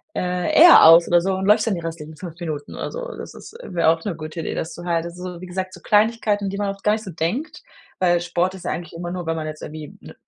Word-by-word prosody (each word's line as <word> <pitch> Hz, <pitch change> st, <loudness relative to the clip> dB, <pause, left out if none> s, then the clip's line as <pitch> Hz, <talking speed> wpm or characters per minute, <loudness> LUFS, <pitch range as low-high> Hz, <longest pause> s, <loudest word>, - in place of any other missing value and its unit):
äh, 180 Hz, 0 st, -1 dB
eher 345 Hz, +2 st, +9 dB
aus 165 Hz, +1 st, +8 dB
oder 175 Hz, 0 st, +4 dB
so 190 Hz, +2 st, -1 dB
und 190 Hz, 0 st, -3 dB
läufst 210 Hz, +3 st, +4 dB
dann 205 Hz, -, +1 dB
die 170 Hz, -, -5 dB
restlichen 160 Hz, -2 st, -7 dB
5 170 Hz, 0 st, -9 dB
Minuten 155 Hz, -4 st, -6 dB
oder -, -, -5 dB
so. -, -, -6 dB
Das -, -, -8 dB
ist -, -, -12 dB
äh, -, -, -10 dB
wäre 170 Hz, -2 st, +3 dB
auch 165 Hz, 0 st, +1 dB
'ne 195 Hz, -, -2 dB
gute 155 Hz, +1 st, -7 dB
Idee, -, -, -4 dB
das 160 Hz, +1 st, -4 dB
du 175 Hz, -, -9 dB
halt 170 Hz, -1 st, 0 dB
also, 180 Hz, 0 st, -7 dB
wie -, -, -7 dB
gesagt, 185 Hz, +1 st, -4 dB
so -, -, -12 dB
Kleinigkeiten, 210 Hz, -1 st, +2 dB
an 195 Hz, -, -1 dB
die 200 Hz, -, -5 dB
man 205 Hz, -1 st, -1 dB
oft 195 Hz, 0 st, -7 dB
gar 210 Hz, -, +3 dB
nicht 220 Hz, -, -3 dB
so 190 Hz, -, -7 dB
denkt, 185 Hz, -, -3 dB, 0.4 s
weil 175 Hz, -2 st, +2 dB
Sport 175 Hz, +2 st, -1 dB
ist 185 Hz, -, -11 dB
ja -, -, -1 dB
eigentlich 170 Hz, 0 st, -6 dB
immer 175 Hz, +1 st, -6 dB
nur, 180 Hz, -1 st, -5 dB
weil 165 Hz, 0 st, -1 dB
man 155 Hz, -1 st, -4 dB
jetzt 155 Hz, 0 st, -7 dB
irgendwie 155 Hz, -1 st, -9 dB
m -, -, -12 dB
175 Hz, 290 wpm, -21 LUFS, 165-195 Hz, 0.4 s, eher